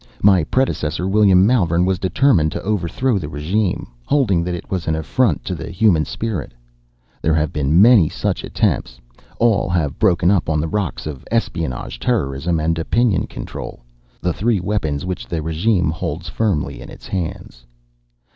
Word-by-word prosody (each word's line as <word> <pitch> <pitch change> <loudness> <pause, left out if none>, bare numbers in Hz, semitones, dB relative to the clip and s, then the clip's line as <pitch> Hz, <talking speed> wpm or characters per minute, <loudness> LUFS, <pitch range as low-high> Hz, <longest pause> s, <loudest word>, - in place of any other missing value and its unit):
My 95 -4 +5
predecessor, 90 - -1
William 95 -2 +5
Malvern, 90 -7 +2
determined 95 - +2
to - - -5
overthrow 105 +4 0
the 75 -5 -6
regime, 90 +7 -1 0.2
holding 105 -12 +2
that 90 0 -2
it 85 - -9
was 90 -4 -2
an 80 - +1
affront 80 - 0
to - - -2
the - - -6
human 85 -3 +2
spirit. 110 - -4 0.7
There 80 0 +2
have 75 -1 0
been 75 +3 +2
many 105 -7 +6
such - - -2
attempts. - - -1 0.4
All 115 -5 +2
have 80 -4 -1
broken 90 -3 +3
up 95 -5 +1
on 75 -1 +1
the 80 - -1
rocks 100 0 -3
of 75 -4 -6
espionage, 85 - -2
terrorism 85 - 0
and 80 +1 0
opinion 110 +5 +1
control - - -8 0.4
the 90 -1 0
three 110 +2 +1
weapons 85 -6 -2
which 90 -1 -4
the 80 -2 -3
regime 85 +2 +1
holds 80 +1 -4
firmly 80 - -1
in - - -10
its - - -12
hands. 80 -9 -5
90 Hz, 160 wpm, -19 LUFS, 80-105 Hz, 0.7 s, many